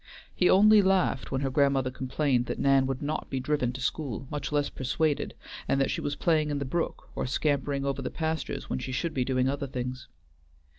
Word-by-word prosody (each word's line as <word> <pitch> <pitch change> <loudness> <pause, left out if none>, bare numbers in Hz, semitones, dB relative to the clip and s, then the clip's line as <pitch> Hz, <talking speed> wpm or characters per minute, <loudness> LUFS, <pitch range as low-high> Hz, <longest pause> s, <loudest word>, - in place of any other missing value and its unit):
He 180 - +3
only 210 +2 +7
laughed 190 -8 +1
when 135 0 -1
her 135 -1 -1
grandmother 135 -2 +2
complained 130 -1 0
that - - -3
Nan 135 -1 +3
would 135 +1 -3
not 155 +2 -3
be 135 - -2
driven 130 -2 0
to 130 - -7
school, 135 -2 -2
much 150 0 -3
less 145 -1 +1
persuaded, 145 +3 -1 0.3
and 135 - +2
that 135 - +2
she - - -2
was 145 - -2
playing 155 -2 +2
in 145 - -1
the 140 - -2
brook, 165 +6 -3
or - - -2
scampering 140 0 0
over 140 -1 -1
the - - -3
pastures 160 -1 -3
when 65 - -2
she 130 - -5
should 165 +6 -2
be 130 - +1
doing 130 0 +1
other 140 +1 -2
things. 125 0 -5
140 Hz, 210 wpm, -28 LUFS, 130-150 Hz, 0.3 s, only